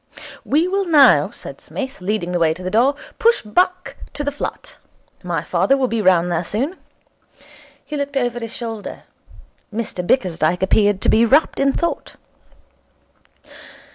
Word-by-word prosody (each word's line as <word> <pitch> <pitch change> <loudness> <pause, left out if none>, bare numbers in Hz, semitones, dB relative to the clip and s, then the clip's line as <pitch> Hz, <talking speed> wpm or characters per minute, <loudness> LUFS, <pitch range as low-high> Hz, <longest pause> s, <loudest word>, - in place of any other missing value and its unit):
'We 315 +5 +1
will 390 +1 0
now,' 300 -6 +5
said - - -9
Psmith, 265 -6 -7
leading 185 -2 -2
the 175 - 0
way 160 -1 +2
to 185 - -10
the 185 - -3
door, 255 +6 +3 0.2
'push 465 - +3
back 360 +11 0 0.2
to 295 - -3
the 285 - -1
flat. 285 - -7 0.5
My - - -2
father 275 - +2
will 260 -1 +1
be 230 -2 -1
round 180 -2 +3
there 170 0 0
soon.' 270 - -3 1.1
He 300 - -6
looked 280 -1 -3
over 245 -2 -1
his 230 -1 -6
shoulder. 225 -4 -7 0.7
Mr 215 -4 -4
Bickersdyke 180 -4 +1
appeared 205 0 +2
to - - +1
be 225 - +4
wrapped 275 +7 +3
in 275 0 +2
thought. 340 -1 -3
235 Hz, 155 wpm, -19 LUFS, 185-285 Hz, 1.1 s, now